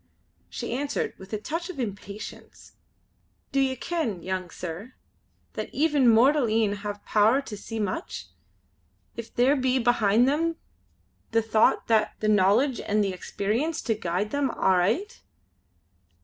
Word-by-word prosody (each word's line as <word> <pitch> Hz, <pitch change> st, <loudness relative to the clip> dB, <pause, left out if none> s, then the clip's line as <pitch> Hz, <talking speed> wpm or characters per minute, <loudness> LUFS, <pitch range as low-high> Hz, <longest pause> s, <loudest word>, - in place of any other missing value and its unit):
She 235 Hz, -1 st, -5 dB
answered 280 Hz, +3 st, -2 dB
with 190 Hz, 0 st, -12 dB
a 215 Hz, -, -1 dB
touch 330 Hz, -, -4 dB
of 360 Hz, -, -7 dB
impatience: 205 Hz, -2 st, -7 dB, 0.8 s
"Do 275 Hz, -, +1 dB
ye 265 Hz, -1 st, +2 dB
ken, 250 Hz, -, -3 dB
young 185 Hz, -1 st, -3 dB
sir, 180 Hz, +9 st, -7 dB, 0.6 s
that -, -, -4 dB
even 290 Hz, -4 st, +3 dB
mortal 255 Hz, +4 st, +5 dB
een 215 Hz, -2 st, +1 dB
have 205 Hz, 0 st, -6 dB
power 220 Hz, +5 st, +4 dB
to 215 Hz, -, -7 dB
see 225 Hz, +2 st, -6 dB
much, 330 Hz, -, -3 dB, 0.9 s
if 235 Hz, -1 st, -7 dB
there 255 Hz, +4 st, +3 dB
be 260 Hz, -1 st, +1 dB
behind 235 Hz, -1 st, +3 dB
them 330 Hz, +4 st, +1 dB, 0.8 s
the 225 Hz, 0 st, +3 dB
thocht, 220 Hz, +1 st, +2 dB
an' 220 Hz, -1 st, +4 dB
the 215 Hz, -, -1 dB
knowledge 215 Hz, +6 st, +3 dB
and 210 Hz, 0 st, +1 dB
the 195 Hz, -2 st, -1 dB
experience 220 Hz, -, -2 dB
to 225 Hz, -, +1 dB
guide 205 Hz, 0 st, -2 dB
them 285 Hz, -2 st, 0 dB
aright. 190 Hz, -, +1 dB
225 Hz, 140 wpm, -26 LUFS, 205-270 Hz, 0.9 s, mortal